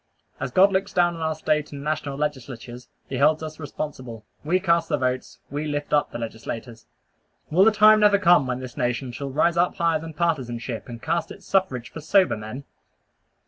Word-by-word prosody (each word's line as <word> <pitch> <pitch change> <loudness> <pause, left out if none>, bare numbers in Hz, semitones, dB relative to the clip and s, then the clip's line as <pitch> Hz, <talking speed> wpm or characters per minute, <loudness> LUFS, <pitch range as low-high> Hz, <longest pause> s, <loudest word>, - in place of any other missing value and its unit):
As - - -3
God 190 +9 +5
looks 190 +1 -1
down 175 -1 +3
on 165 - -8
our 160 0 -1
State 150 -1 -1
and 140 -1 -7
national 150 -2 -2
legislatures, 125 -4 -5 0.2
he 130 - -4
holds 155 +2 +3
us 155 0 -7
responsible. 130 -6 -6 0.2
We 175 +5 +2
cast 170 -2 +1
the 150 - +1
votes. 130 -1 -2
We 145 +2 -3
lift 145 0 -3
up 145 - +3
the - - -5
legislators. 115 0 -7 0.6
Will 180 +5 +5
the 225 - +6
time 215 +1 +6
never 210 -1 +5
come 175 -8 +4
when 125 0 -3
this 125 -2 -8
nation 125 +1 -2
shall 135 +3 -5
rise 155 +5 +1
up 175 +1 +2
higher 165 -2 +1
than 160 -1 -9
partisanship, 125 -9 -2
and 115 -1 -9
cast 170 +1 -1
its - - -12
suffrage 130 -11 0
for 160 - -8
sober 185 - +3
men? 110 +5 -7
150 Hz, 195 wpm, -24 LUFS, 125-170 Hz, 0.6 s, the